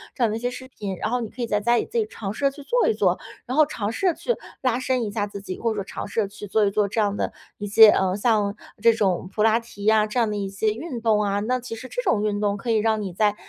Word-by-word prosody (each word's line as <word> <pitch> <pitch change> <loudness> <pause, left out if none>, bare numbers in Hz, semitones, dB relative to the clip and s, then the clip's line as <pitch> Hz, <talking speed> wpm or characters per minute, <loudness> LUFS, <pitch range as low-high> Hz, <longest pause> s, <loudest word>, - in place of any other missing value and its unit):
这 255 - 0
样 230 - +3
的 220 - -2
一 - - -5
些 245 +1 -1
视 260 +1 -9
频。 205 -7 -5
然 215 - -2
后 250 - +1
你 225 - -4
可 250 - -9
以 235 - -1
在 210 -2 +1
家 235 +3 +2
里 - - 0
自 475 - -5
己 450 - +2
尝 200 - -5
试 - - -9
着 275 - +4
去 285 +1 -12
做 485 - +2
一 450 - +3
做， - - +1 0.3
然 255 +3 -3
后 310 - +7
尝 210 -6 -3
试 310 - -3
着 355 - +3
去 485 +8 -1 0.3
拉 255 -2 +1
伸 255 -1 0
一 210 - -3
下 205 0 -1
自 200 -1 -8
己， 185 -2 -6
或 230 - 0
者 - - -3
说 200 - -2
尝 - - -6
试 215 +2 0
着 205 - -1
去 205 +1 -9
做 215 +2 +2
一 200 - +1
做 205 0 +1
这 215 - -2
样 205 -1 +1
的 - - -2 0.2
一 205 - -5
些， 215 +2 +8
呃， 190 -2 +2
像 210 -2 +1 0.3
这 230 0 +6
种 190 -4 0
普 210 - -1
拉 225 +1 +4
提 230 -3 -12
呀 215 0 +5
这 215 +4 -1
样 230 -2 +2
的 210 - -2
一 200 - -2
些 200 +2 0
运 245 0 -6
动 220 -2 +3
啊。 200 0 0
那 250 +4 0
其 240 -2 -7
实 255 +3 -9
这 - - -3
种 225 - +2
运 205 -1 0
动 205 -1 +1
可 220 +4 -6
以 225 - +3
让 220 0 +1
你 190 -3 -5
在 210 +2 +2
220 Hz, 350 characters per minute, -24 LUFS, 205-240 Hz, 0.3 s, 些